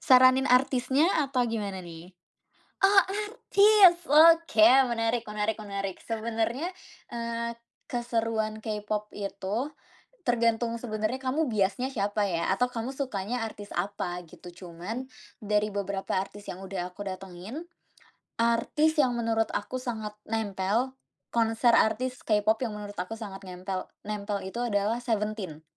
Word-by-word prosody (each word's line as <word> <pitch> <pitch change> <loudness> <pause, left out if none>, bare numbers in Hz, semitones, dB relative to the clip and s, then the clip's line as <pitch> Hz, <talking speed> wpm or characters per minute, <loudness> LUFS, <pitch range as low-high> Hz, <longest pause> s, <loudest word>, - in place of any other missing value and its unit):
Saranin 260 -1 +6
artisnya 260 +3 +3 0.2
atau 260 -2 0
gimana 205 -5 -3
nih? 170 +1 -10 0.7
Oh 390 0 +8
artis, 415 -2 +5
oke, 320 -7 +7 0.2
menarik 230 0 0
menarik 210 +1 -2
menarik. 195 -2 -4
Sebenarnya, 230 +6 -2 0.4
eee, 235 0 -3 0.3
keseruan 225 -3 -1
Kpop 210 -1 -4
itu 200 0 -4 0.7
tergantung 235 -1 +2
sebenarnya 230 +2 -3
kamu 280 +5 0
biasnya 220 +2 0
siapa 205 0 0
ya, 170 -3 -1
atau 245 +6 +2
kamu 245 0 -4
sukanya 245 -4 -3
artis 205 -2 -9
apa, 180 -3 -3
gitu. 175 +2 -12 0.2
Cuman 195 +10 -6 0.3
dari 210 0 0
beberapa 200 -1 -2
artis 200 +2 -6
yang 180 - -7
udah 180 -2 -4
aku 200 +2 -8
datengin, 190 - -7 0.7
artis 235 +7 +2
yang 255 -4 +3
menurut 225 -1 +1
aku 255 +5 -3
sangat 220 -4 -4
nempel, 220 +4 -1 0.3
konser 230 +1 +3
artis 255 +3 +2
Kpop 215 +1 +3
yang 225 -4 -2
menurut 205 -1 -8
aku 180 +5 -3
sangat 200 -3 -8
nempel 185 +1 -5 0.2
nempel 205 -1 -3
itu 190 +5 -5
adalah 220 -1 0
Seventeen. 210 -9 -3
225 Hz, 125 wpm, -28 LUFS, 200-245 Hz, 0.7 s, Oh